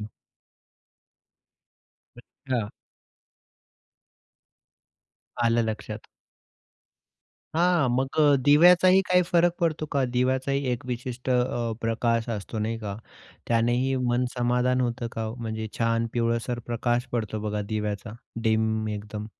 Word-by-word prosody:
हं. 105 Hz, -, -6 dB, 2.1 s
अच्छा. 120 Hz, -6 st, -5 dB, 2.7 s
आलं 115 Hz, 0 st, +3 dB
लक्षात. 110 Hz, -1 st, -4 dB, 1.6 s
हां, 175 Hz, -5 st, +3 dB
मग 130 Hz, +2 st, -1 dB
अ, 145 Hz, -2 st, +6 dB
दिव्याचाही 180 Hz, +5 st, +7 dB
काही 180 Hz, 0 st, +4 dB
फरक 175 Hz, 0 st, +4 dB
पडतो 160 Hz, -2 st, 0 dB
का? 140 Hz, -2 st, +2 dB
दिव्याचाही 130 Hz, +2 st, +1 dB
एक 120 Hz, +1 st, -4 dB
विशिष्ट 125 Hz, +1 st, -4 dB
अ, 125 Hz, -2 st, 0 dB
प्रकाश 115 Hz, 0 st, 0 dB
असतो 105 Hz, +2 st, -6 dB
नाही 110 Hz, +2 st, -2 dB
का? 105 Hz, -3 st, -5 dB, 0.5 s
त्यानेही 120 Hz, +3 st, +2 dB
मन 120 Hz, +1 st, +1 dB
समाधान 125 Hz, +1 st, +1 dB
होतं 120 Hz, -1 st, -2 dB
का 115 Hz, -, -4 dB
हो, 110 Hz, +1 st, -4 dB
म्हणजे 110 Hz, -2 st, -4 dB
छान 115 Hz, 0 st, +1 dB
पिवळसर 115 Hz, +1 st, -1 dB
प्रकाश 120 Hz, +1 st, 0 dB
पडतो 110 Hz, -2 st, -2 dB
बघा 105 Hz, 0 st, -2 dB
दिव्याचा, 105 Hz, -1 st, -4 dB, 0.3 s
डीम 110 Hz, -1 st, +1 dB
एकदम? 105 Hz, 0 st, -5 dB
120 Hz, 110 wpm, -26 LUFS, 110-130 Hz, 2.7 s, दिव्याचाही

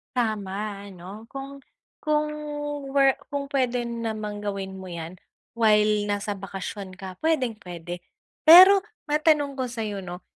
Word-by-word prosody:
Tama, 205 Hz, -3 st, -2 dB
ano? 195 Hz, +4 st, -10 dB
Kung 275 Hz, +2 st, -8 dB, 0.4 s
kung 300 Hz, 0 st, +1 dB, 0.6 s
wor 275 Hz, -1 st, +4 dB
kung 280 Hz, -1 st, -4 dB
pwede 250 Hz, -3 st, +1 dB
namang 220 Hz, -3 st, -4 dB
gawin 195 Hz, -2 st, -4 dB
mo 185 Hz, -, -8 dB
'yan, 170 Hz, +1 st, -7 dB, 0.4 s
while 210 Hz, -2 st, +3 dB
nasa 205 Hz, 0 st, -1 dB
bakasyon 195 Hz, 0 st, -6 dB
ka, 185 Hz, -1 st, -9 dB
pwedeng-pwede. 215 Hz, -, -2 dB, 0.5 s
Pero 375 Hz, +4 st, +11 dB, 0.3 s
matanong 295 Hz, -2 st, +2 dB
ko 260 Hz, -, 0 dB
sa'yo, 220 Hz, -4 st, -4 dB
'no, 180 Hz, -1 st, -8 dB
215 Hz, 120 wpm, -25 LUFS, 195-270 Hz, 0.6 s, Pero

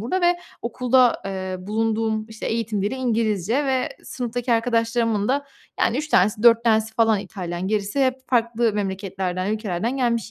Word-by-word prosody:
burada 310 Hz, -, -1 dB
ve 350 Hz, 0 st, +3 dB, 0.3 s
okulda, 250 Hz, +1 st, +2 dB
eee, 190 Hz, -1 st, -4 dB
bulunduğum, 220 Hz, +2 st, -1 dB
işte, 220 Hz, 0 st, -7 dB
eğitim 225 Hz, -3 st, -1 dB
dili 210 Hz, +6 st, -1 dB
İngilizce 230 Hz, 0 st, 0 dB
ve 260 Hz, -1 st, +1 dB, 0.2 s
sınıftaki 245 Hz, -1 st, -3 dB
arkadaşlarımın 230 Hz, -2 st, +1 dB
da, 280 Hz, +2 st, +1 dB, 0.4 s
yani, 235 Hz, -, +2 dB
3 305 Hz, +1 st, -3 dB
tanesi 210 Hz, -1 st, +3 dB
4 235 Hz, 0 st, +6 dB
tanesi 220 Hz, -1 st, +2 dB
falan 225 Hz, -2 st, +3 dB
İtalyan, 180 Hz, -2 st, -5 dB
gerisi 215 Hz, +6 st, 0 dB
hep 255 Hz, -, 0 dB
farklı 235 Hz, -2 st, +1 dB
memleketlerden, 190 Hz, -2 st, -2 dB
ülkelerden 215 Hz, +3 st, -2 dB
gelmiş 235 Hz, -4 st, 0 dB
225 Hz, 150 wpm, -23 LUFS, 205-240 Hz, 0.4 s, 4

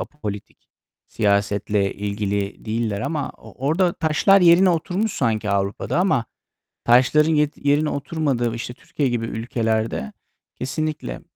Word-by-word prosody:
apolitik, 105 Hz, -9 st, -7 dB, 0.4 s
siyasetle 100 Hz, -1 st, 0 dB
ilgili 100 Hz, 0 st, -3 dB
değiller 110 Hz, -2 st, -2 dB
ama 145 Hz, +3 st, -2 dB
o 135 Hz, -, -8 dB
orada 175 Hz, +3 st, +2 dB
taşlar 175 Hz, +5 st, +3 dB
yerine 180 Hz, +2 st, +6 dB
oturmuş 180 Hz, +6 st, -1 dB
sanki 110 Hz, -4 st, -1 dB
Avrupa'da 100 Hz, -, -1 dB
ama 180 Hz, -11 st, +2 dB, 0.6 s
taşların 130 Hz, +6 st, +4 dB
ye 150 Hz, -1 st, +3 dB
yerine 145 Hz, +2 st, +1 dB
oturmadığı 135 Hz, -5 st, -1 dB
işte 115 Hz, +1 st, -5 dB
Türkiye 140 Hz, +1 st, -3 dB
gibi 120 Hz, -1 st, -1 dB
ülkelerde 110 Hz, -, -2 dB, 0.4 s
kesinlikle 140 Hz, -, -4 dB
120 Hz, 115 wpm, -22 LUFS, 105-155 Hz, 0.6 s, yerine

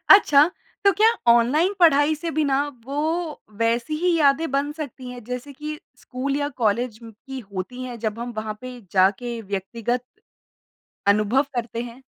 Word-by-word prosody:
अच्छा, 305 Hz, -6 st, +7 dB, 0.3 s
तो 395 Hz, -, +6 dB
क्या 425 Hz, +4 st, +4 dB, 0.2 s
ऑनलाइन 255 Hz, +11 st, +4 dB
पढ़ाई 300 Hz, -2 st, +5 dB
से 330 Hz, +2 st, -4 dB
बिना 280 Hz, -3 st, +2 dB, 0.3 s
वो 275 Hz, +2 st, -4 dB, 0.6 s
वैसी 235 Hz, +6 st, +1 dB
ही 355 Hz, +1 st, +2 dB
यादें 295 Hz, +1 st, +3 dB
बन 280 Hz, +2 st, 0 dB
सकती 280 Hz, -5 st, -7 dB
हैं 245 Hz, -1 st, -9 dB
जैसे 250 Hz, +4 st, -6 dB
कि 300 Hz, +2 st, -6 dB, 0.2 s
स्कूल 270 Hz, +2 st, -3 dB
या 285 Hz, 0 st, 0 dB
कॉलेज 220 Hz, +1 st, +1 dB
म् 225 Hz, -1 st, -10 dB
की 270 Hz, -1 st, -6 dB
होती 190 Hz, +7 st, -5 dB
हैं 250 Hz, -2 st, -6 dB
जब 220 Hz, 0 st, -3 dB
हम 240 Hz, +1 st, -5 dB
वहाँ 215 Hz, 0 st, -3 dB
पे 255 Hz, -1 st, -8 dB
जाके 200 Hz, +5 st, +2 dB
व्यक्तिगत 230 Hz, +5 st, -2 dB, 1.1 s
अनुभव 215 Hz, +6 st, +4 dB
करते 235 Hz, -1 st, -3 dB
हैं? 245 Hz, +2 st, -10 dB
255 Hz, 160 wpm, -23 LUFS, 230-290 Hz, 1.1 s, अच्छा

